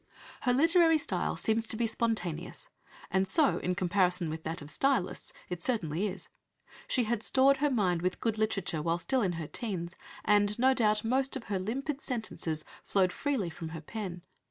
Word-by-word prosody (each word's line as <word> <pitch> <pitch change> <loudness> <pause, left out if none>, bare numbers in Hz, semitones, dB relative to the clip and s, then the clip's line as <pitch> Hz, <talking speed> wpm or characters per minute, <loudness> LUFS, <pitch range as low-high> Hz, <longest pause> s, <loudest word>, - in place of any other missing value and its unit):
Her 250 - +2
literary 330 +2 +5
style 300 - -1
seems 225 0 +1
to 220 - -1
be 235 - +1
spontaneous, 205 -8 -2 0.4
and 190 0 +2
so, 300 - +3
in 180 0 -1
comparison 180 -2 +1
with 160 0 -5
that 160 +1 -3
of 145 - -5
"stylists," 270 -9 0 0.2
it 180 -1 -5
certainly 190 - 0
is. 185 -2 -7 0.6
She 250 - +1
had 225 -1 -1
stored 270 +3 +4
her 295 +1 +2
mind 185 -9 +1
with 185 +1 -1
good 220 -2 -1
literature 195 -7 0
while 165 +2 0
still 255 +8 0
in 185 -4 +1
her 165 -2 -4
teens, 180 - -4 0.3
and 205 0 +3
no 260 +2 +4
doubt 215 -4 +2
most 260 +4 +1
of 265 - -5
her 200 -3 -2
limpid 270 +9 -3
sentences 195 - -3 0.2
flowed 185 -2 +2
freely 260 - -1
from 160 +1 -7
her - - -8
pen. 180 -1 -6
210 Hz, 180 wpm, -30 LUFS, 175-250 Hz, 0.6 s, literary